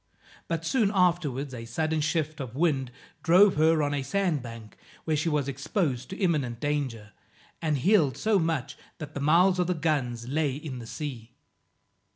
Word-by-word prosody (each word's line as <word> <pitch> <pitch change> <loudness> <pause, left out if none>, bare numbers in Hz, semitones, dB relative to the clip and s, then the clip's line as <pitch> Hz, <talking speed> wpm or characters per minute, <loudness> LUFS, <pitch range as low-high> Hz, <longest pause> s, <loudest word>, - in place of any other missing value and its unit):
But 165 -2 -2
soon 220 +2 +2
afterwards, 165 - +1
a 115 -2 -7
sudden 155 +6 -1
shift 155 0 -1
of 130 -3 -6
wind 140 -5 +1 0.3
drove 185 +4 +6
her 160 0 +4
on 145 0 0
a 145 - -1
sand 165 +1 0
bank, 115 -3 -10 0.3
where 160 - 0
she 150 +3 0
was 150 -3 0
exposed 135 - -2
to 190 - -6
imminent 145 - 0
danger, 130 -8 -2 0.5
and 155 -3 +1
heeled 160 -2 +3
so 215 -2 +2
much 150 -4 -2 0.2
that 155 -4 -8
the - - -4
mouths 180 +5 +4
of 180 - +2
the 180 - 0
guns 130 -7 -1
lay 145 0 0
in 140 -3 -6
the 115 - -9
sea. 120 -5 -6
150 Hz, 175 wpm, -27 LUFS, 130-165 Hz, 0.5 s, drove